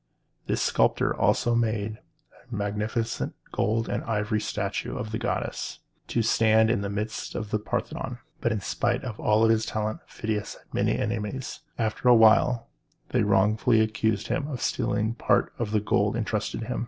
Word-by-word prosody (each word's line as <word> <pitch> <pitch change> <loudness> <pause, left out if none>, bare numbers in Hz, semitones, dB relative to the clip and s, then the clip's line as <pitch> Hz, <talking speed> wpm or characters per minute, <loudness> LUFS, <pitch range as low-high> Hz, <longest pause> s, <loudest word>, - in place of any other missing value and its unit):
This - - 0
sculptor - - +2
also 120 - +2
made 110 -2 0 0.5
a - - -3
magnificent 105 +3 -2 0.2
gold 115 +2 0
and - - -2
ivory 105 -1 0
statue - - -3
of 110 - -4
the 110 - -2
goddess, - - -3 0.3
to 115 - 0
stand 110 0 +4
in 115 - +1
the 100 - -3
midst 105 +2 -4
of 105 -2 -4
the 110 - +1
Parthenon. 120 +3 -3 0.2
But 120 - 0
in 105 -2 -1
spite - - 0
of 115 -5 -6
all 110 +1 +4
his 110 0 +3
talent, 110 0 -2
Phidias 110 -1 -3
had - - -22
many - - +1
enemies. 115 +3 -3 0.2
After 115 +2 +1
a 120 - +9
while 115 +1 +5 0.4
they - - +2
wrongfully 105 +3 +3
accused 110 -1 +1
him 145 - -1
of 135 -5 -4
stealing 110 +2 0
part 120 - +1
of 115 -3 -1
the 105 0 +2
gold 105 0 +1
intrusted 110 -1 -2
to - - -4
him. 125 +2 -3
110 Hz, 170 wpm, -26 LUFS, 105-115 Hz, 0.5 s, a